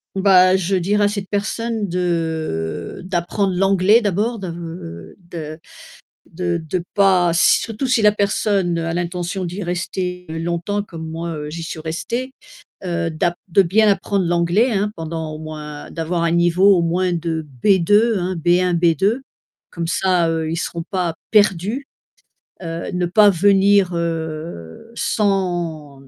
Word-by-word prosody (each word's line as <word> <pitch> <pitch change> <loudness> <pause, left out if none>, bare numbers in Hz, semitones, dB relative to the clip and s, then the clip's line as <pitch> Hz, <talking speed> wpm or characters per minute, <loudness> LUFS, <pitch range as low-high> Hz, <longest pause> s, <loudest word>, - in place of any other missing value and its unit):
Bah, 185 -1 +5
je 190 +1 0
dirais 205 +3 +1
à - - +4
cette 200 -2 -4
personne 215 +1 -2
de 160 - -2
d'apprendre 185 +2 -1
l'anglais 195 +4 +4
d'abord, 215 +3 -1
de 165 - -8
de 155 -2 -7 0.7
de 175 0 -2
de 170 +2 -3
pas 185 -4 +4
surtout 225 +7 +2
si 250 -2 +3
la 210 0 +6
personne 200 -4 0
a 165 0 -2
l'intention 175 +2 -3
d'y 180 +4 -5
rester 180 +1 -3
longtemps 170 +5 -2
comme 165 -5 -8
moi, 165 +1 -4
heu, 150 0 -6
j'y 165 +1 -6
suis 160 -1 -6
restée, 235 +11 -4 0.5
heu, 170 -2 -1
d'ap 170 +2 0
de 190 +3 +5
bien 210 +5 +3
apprendre 195 -1 0
l'anglais, 175 +8 +2
hein, 210 0 0
pendant 160 -2 -5
au 155 - -7
moins 150 -1 -8
d'avoir 170 +1 -2
un 170 - +2
niveau, 175 +3 +4
au 175 - +2
moins 180 +2 0
de 165 -2 -2 0.2
B2, 205 +4 +4
hein, 180 +1 -2
B1-B2, 175 - +2 0.5
comme 170 -1 -4
ça, 180 -2 +2
heu, 160 -1 -1
ils 165 - -2
seront 170 -1 -4
pas 180 -4 -2 0.2
perdus, 210 +5 +2 0.7
heu, 165 -1 -5
ne 180 -1 -1
pas 205 +4 +5
venir, 195 0 +4
heu, 160 - -5
sans, 175 -10 -1
mmh, 135 - -18
175 Hz, 145 wpm, -20 LUFS, 165-195 Hz, 0.7 s, la